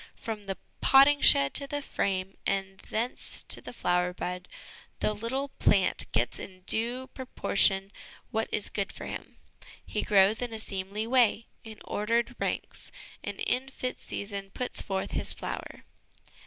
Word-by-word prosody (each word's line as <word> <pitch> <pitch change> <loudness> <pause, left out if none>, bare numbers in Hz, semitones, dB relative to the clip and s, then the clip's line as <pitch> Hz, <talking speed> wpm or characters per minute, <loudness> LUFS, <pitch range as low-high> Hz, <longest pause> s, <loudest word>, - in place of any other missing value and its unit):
From 215 -3 -5
the 195 -2 -3 0.2
potting 280 +2 +7
shed 140 0 +6
to 280 - -1
the 290 +1 -2
frame 195 -5 -1
and 195 0 -1
thence 230 +4 -2
to - - +3
the - - -8
flower 180 -5 +1
bed, 180 0 -4 0.5
the 215 - +1
little 250 +7 -2
plant 195 -2 +4
gets 120 +2 0
in 185 -1 -9
due 235 +6 +1
proportion 200 -6 +2 0.4
what 220 -1 0
is 210 - 0
good 200 -2 -2
for - - -8
him. - - -7 0.5
He - - -2
grows 205 +2 +4
in 240 -2 -3
a 220 - -4
seemly 200 +1 -1
way, 235 -2 +3 0.2
in 220 -1 -10
ordered 230 +3 0
ranks; - - -3 0.3
and - - -5
in 260 +2 +1
fit 255 -2 -4
season 200 -1 -5
puts 250 +5 -2
forth 190 -1 -2
his - - 0
flower. - - -6
210 Hz, 155 wpm, -29 LUFS, 195-240 Hz, 0.5 s, potting